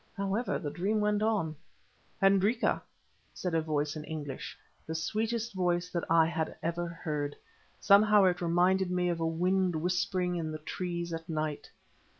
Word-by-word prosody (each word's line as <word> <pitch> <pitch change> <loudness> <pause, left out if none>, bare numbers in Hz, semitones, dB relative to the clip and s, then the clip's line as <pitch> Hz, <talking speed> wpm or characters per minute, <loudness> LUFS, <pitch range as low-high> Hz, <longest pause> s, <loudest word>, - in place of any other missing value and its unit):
However, 200 +5 -1
the 150 -5 -4
dream 200 +7 0
went 210 0 +1
on. 210 -8 0 0.6
"Hendrika," 200 +5 +3 0.5
said 180 -2 -3
a 165 - +3
voice 150 -1 -1
in 155 - -5
English, 145 -4 -6 0.3
the 160 - -3
sweetest 220 +7 -1
voice 180 -1 0
that 170 - -2
I 165 0 +6
had 160 -1 -2
ever 170 +1 -1
heard; 150 -4 -3 0.4
somehow 210 0 +6
it 180 -1 +2
reminded 180 +2 +2
me 180 0 +1
of 170 -1 -1
wind 180 +2 +1
whispering 180 +2 0
in 160 -2 -3
the 155 - -4
trees 170 +2 -4
at 165 +1 -6
night. 155 -2 -3
175 Hz, 155 wpm, -30 LUFS, 160-195 Hz, 0.6 s, I